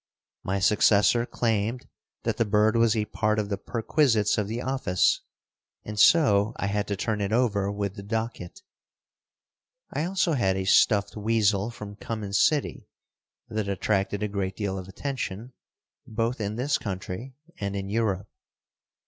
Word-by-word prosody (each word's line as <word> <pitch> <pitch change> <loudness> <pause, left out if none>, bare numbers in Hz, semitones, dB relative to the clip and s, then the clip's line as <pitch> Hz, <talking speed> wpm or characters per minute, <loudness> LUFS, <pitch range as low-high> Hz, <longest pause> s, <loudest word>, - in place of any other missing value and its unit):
My 95 +1 -2
successor 105 +3 +4
claimed 115 +1 -1 0.4
that - - -1
the - - +3
bird 105 +1 +2
was 115 -1 +3
a 105 - 0
part 105 0 0
of 105 -2 -1
the 100 - -1
perquisites 115 -1 +1
of 105 - -1
the 115 +3 -3
office, 125 -9 +1 0.6
and 105 0 -5
so 110 -10 +5
I - - -3
had 100 +1 -1
to 100 - -1
turn 105 +1 -2
it 100 0 -1
over 105 -4 +1
with 100 -1 -3
the 100 - -8
docket. 110 - -4 1.3
I 150 - -1
also 185 -1 +1
had 95 -8 +1
a 95 - -2
stuffed 100 +1 +3
weasel 105 -1 +1
from 105 -3 -9
Cummins 105 -3 -3
City 150 -2 0 0.6
that 110 -2 -3
attracted 100 +1 0
a - - +1
great 100 -2 -3
deal 95 -3 -3
of 95 - -9
attention, 125 0 -5 0.5
both 115 +2 -2
in 105 +1 -2
this 130 +4 0
country 100 +5 -6 0.2
and 100 0 -3
in 95 -1 -3
Europe. 100 -2 -1
105 Hz, 155 wpm, -26 LUFS, 100-115 Hz, 1.3 s, so